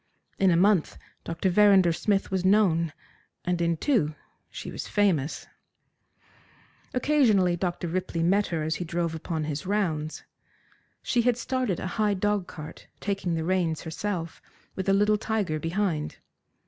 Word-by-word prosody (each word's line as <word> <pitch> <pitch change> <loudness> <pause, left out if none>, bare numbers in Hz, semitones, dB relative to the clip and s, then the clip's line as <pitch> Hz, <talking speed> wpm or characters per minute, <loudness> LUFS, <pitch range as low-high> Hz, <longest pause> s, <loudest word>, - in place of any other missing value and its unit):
In 195 - +5
a 170 - +4
month 195 -2 +3 0.3
Dr. 165 +3 -1
Verrinder 195 -3 +5
Smith 195 +3 0
was 190 -1 0
known, 185 -5 +3 0.5
and 175 -1 0
in 170 -1 +1
two 170 - +1 0.3
she - - -7
was - - -6
famous. 180 -9 +1 1.5
Occasionally, 235 -10 +3
Dr. 175 0 -2
Ripley 175 -1 -2
met 195 +4 +3
her 165 -3 -2
as 160 +1 -1
he - - -3
drove 170 -1 -2
upon 160 0 -3
his 150 +2 -4
rounds. 160 -7 -1 0.8
She 240 - +2
had 240 0 +2
started 250 -6 -1
a - - -4 0.2
high 210 -1 +2
dogcart, 190 -6 -3
taking 195 -4 -2
the 160 - -2
reins 175 -3 0
herself, 165 0 -4 0.3
with 190 0 -2
a - - +5
little 210 +1 +3
tiger 210 -9 -1
behind. 165 -1 -2
185 Hz, 145 wpm, -27 LUFS, 165-205 Hz, 1.5 s, In